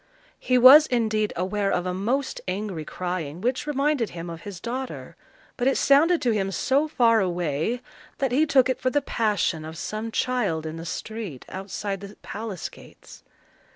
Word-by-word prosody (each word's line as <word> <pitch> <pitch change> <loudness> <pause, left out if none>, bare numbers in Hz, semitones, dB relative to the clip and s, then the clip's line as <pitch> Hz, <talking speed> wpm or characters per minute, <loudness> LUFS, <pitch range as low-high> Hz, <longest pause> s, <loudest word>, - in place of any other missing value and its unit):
He 255 - +2
was 270 +5 +9
indeed 220 -3 0
aware 195 +3 -1
of 180 - 0
a 180 - -1
most 245 +9 -1
angry 185 -3 -3
crying, 175 -2 -4
which 250 +7 -1
reminded 285 -4 +1
him 170 0 -7
of 165 -1 -8
his 195 -2 -8
daughter; 255 +6 -5 0.4
but 245 - +1
it 270 - +3
sounded 320 +5 +4
to 245 - +3
him 195 -3 0
so 270 - +1
far 235 -6 +3
away, 175 - -1 0.4
that 270 -2 0
he 300 +5 +3
took 265 -4 +4
it 260 -1 -2
for 255 - +2
the 290 +1 0
passion 205 - 0
of 160 +1 -8
some 215 +6 -4
child 210 -12 0
in 160 +1 -5
the 165 +1 -7
street, 215 - -6
outside 195 +1 -5
the 200 +1 -9
palace 210 -4 -5
gates. - - -15
215 Hz, 175 wpm, -25 LUFS, 180-255 Hz, 0.4 s, was